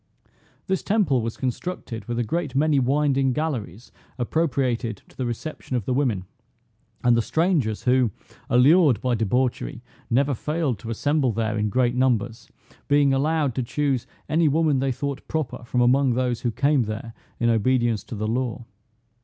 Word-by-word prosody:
This 190 -1 -1
temple 190 - +2
was 115 0 -4
constructed 130 -2 -4
with 120 -1 -3
a 120 - +1
great 165 +7 -3
many 145 0 +3
winding 135 0 +2
galleries 120 - -4 0.3
appropriated 125 - -1
to - - -21
the 130 - -2
reception 130 +2 -5
of 120 -6 -1
the 130 - 0
women, 120 -9 0 0.8
and 120 -1 +5
the 115 - +3
strangers 155 - 0
who, 125 -2 +3 0.4
allured 140 +2 +5
by 125 -1 0
debauchery, 120 +3 -1 0.3
never 140 +4 +2
failed 150 - -2
to 115 - -8
assemble 140 +3 +1
there 110 0 -1
in 105 -1 0
great 120 +2 +2
numbers, 120 -3 0 0.4
being 145 -1 +4
allowed 145 0 +1
to 130 - -1
choose 135 0 -1 0.2
any 160 +1 +2
woman 150 -2 +2
they 135 0 0
thought 140 +2 -4
proper 155 -6 -3
from 125 +1 0
among 130 +1 +3
those 125 -2 -1
who 120 - 0
came 140 +2 +2
there 110 +2 -6 0.3
in 120 0 +3
obedience 120 -1 +1
to - - -7
the 105 +1 -2
law. 120 +1 -2
130 Hz, 160 wpm, -24 LUFS, 115-145 Hz, 0.8 s, and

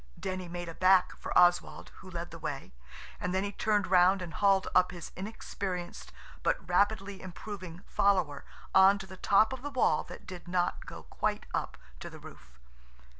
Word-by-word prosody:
Denny 185 -1 -4
made 175 0 -6
a 165 - -6
back 185 +1 +4
for - - -7
Oswald, 175 0 +3
who 190 - -12
led 170 -1 -6
the 165 - -9
way, 150 -3 -5 0.5
and 180 +1 -2
then 190 - +1
he 205 - -3
turned 205 0 +1
round 185 +1 +5
and 170 -1 -7
hauled 195 0 +3
up 185 0 +5
his 175 -2 -8
inexperienced, 185 -3 -5 0.3
but - - -1
rapidly 200 -1 +1
improving, 185 -1 -8
follower 185 -8 +1 0.3
on 190 +1 +7
to 195 - -8
the 190 0 -11
top 210 +6 +3
of 260 - -7
the 290 - -4
wall 250 - +2
that 180 - -11
did 180 -1 -9
not 175 0 -1
go - - -9
quite - - -2
up - - -2 0.2
to - - -7
the - - -11
roof. - - -14
185 Hz, 180 wpm, -30 LUFS, 175-200 Hz, 0.5 s, on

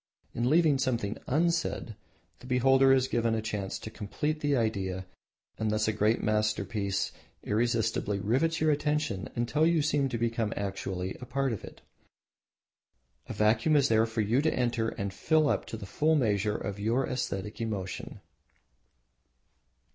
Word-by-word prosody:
In 120 +2 0
leaving 155 -3 +4
something 115 -5 -1
unsaid 165 -6 0 0.4
the 125 - -12
beholder 135 +1 +4
is 130 -1 +4
given 115 -2 +1
a - - 0
chance 105 -3 -3
to 110 - -8
complete 150 +10 -3
the 145 -1 +1
idea 95 -6 -1 0.5
and 110 -1 0
thus 110 0 +1
a 110 - +1
great 105 +2 +1
masterpiece 105 -2 0 0.3
irresistibly 110 -2 0
rivets 135 - +1
your 155 0 +3
attention 150 -8 -1
until 120 +6 +1
you 165 -2 +3
seem 145 -2 +1
to 120 - -2
become 115 -1 -1
actually 95 -2 -3
a - - -6
part 135 0 -1
of 105 - -6
it. - - -11 1.5
A - - -3
vacuum 110 +9 +3
is 140 -2 +4
there 110 0 +4
for 110 0 -1
you 115 +6 +2
to 160 +1 +2
enter 120 -2 0
and 100 -2 -4
fill 155 +8 +2
up - - 0
the 110 -3 -6
full 155 +10 +1
measure 105 -6 +1
of 100 -1 -5
your 115 +6 +1
aesthetic 105 -5 -3
emotion. 100 -5 -4
115 Hz, 155 wpm, -29 LUFS, 105-135 Hz, 1.5 s, leaving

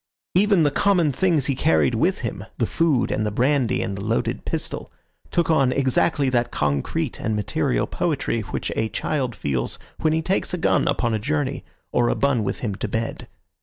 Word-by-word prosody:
Even 195 -2 +4
the 145 - +3
common 175 -2 +3
things 160 -1 +2
he 140 - +1
carried 80 - +2
with - - +1
him—the - - -3
food 155 -7 +1
and - - 0
the 105 - 0
brandy 125 +2 +1
and 100 - -3
the 100 - -6
loaded 115 +2 -1
pistol—took 170 -1 -3
on 135 -5 +3
exactly 140 +2 +2
that 120 -2 +1
concrete 70 -2 -1
and 110 -1 -1
material 100 -11 0
poetry - - -1
which - - -4
a 110 - 0
child 130 -3 -2
feels 65 -4 -2 0.2
when 155 - +2
he 160 +1 0
takes 185 +1 0
a - - -4
gun - - +2
upon 120 -2 +1
a 110 - 0
journey 140 +3 -1 0.3
or 120 -1 +2
a - - +1
bun 140 -5 +1
with 100 - -3
him 105 -5 -2
to 95 - -4
bed. 115 0 -3
130 Hz, 185 wpm, -23 LUFS, 110-155 Hz, 0.3 s, Even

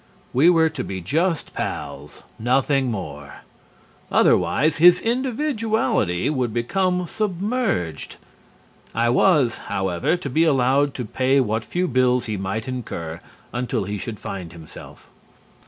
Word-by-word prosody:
We 145 +7 +5
were 165 -2 +4
to 150 -5 -5
be 95 -1 -5
just 160 - -1
pals, - - -6 0.2
nothing 130 +3 +2
more. 100 -5 -7 0.7
Otherwise, 155 +1 +3
his 175 +2 +7
individuality 225 - 0
would 130 -6 0
become 180 +9 0
submerged. 195 - -2 0.8
I 115 +1 +2
was, 135 -4 +3
however, 95 - 0
to 175 - -6
be 155 +5 +2
allowed 140 -1 +2
to 125 - -4
pay 130 +5 +2
what 110 -3 0
few 180 +10 -1
bills 125 -2 +2
he 110 - -3
might 100 +4 -3
incur 85 -10 -5 0.3
until 125 -4 -1
he 100 +1 -4
should 105 +1 -6
find 90 -4 -6
himself. 80 -2 -12
130 Hz, 125 wpm, -22 LUFS, 110-175 Hz, 0.8 s, his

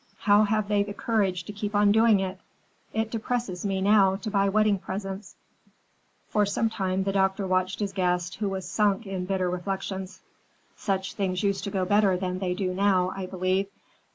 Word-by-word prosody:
How 210 0 +5
have 215 0 0
they 205 -1 +2
the 200 0 -4
courage 195 -6 0
to 205 - -8
keep 210 0 -4
on 205 0 +5
doing 220 -1 +5
it? 190 0 -4 0.5
It 220 0 -2
depresses 225 -5 -3
me 195 -2 -1
now 195 -1 +4
to 215 +2 -5
buy 200 -1 +2
wedding 215 -1 +2
presents." 195 +1 -6 0.9
For 210 - +2
some 205 +2 0
time 190 -2 -1
the 195 - 0
doctor 190 0 +1
watched 185 0 0
his 200 -1 -2
guest, 180 -3 0
who 205 -1 -1
was 190 -2 -4
sunk 205 +3 +1
in 190 -2 -4
bitter 185 -1 0
reflections. 190 +1 -4 0.5
"Such 190 -2 -2
things 190 -3 -1
used 200 -1 0
to - - -2
go 190 -2 -1
better 200 -1 +3
than 185 0 -3
they 180 -2 -1
do 185 -1 -2
now, 185 -1 +2
I 190 -1 -4
believe. 185 +1 0
195 Hz, 185 wpm, -26 LUFS, 185-205 Hz, 0.9 s, How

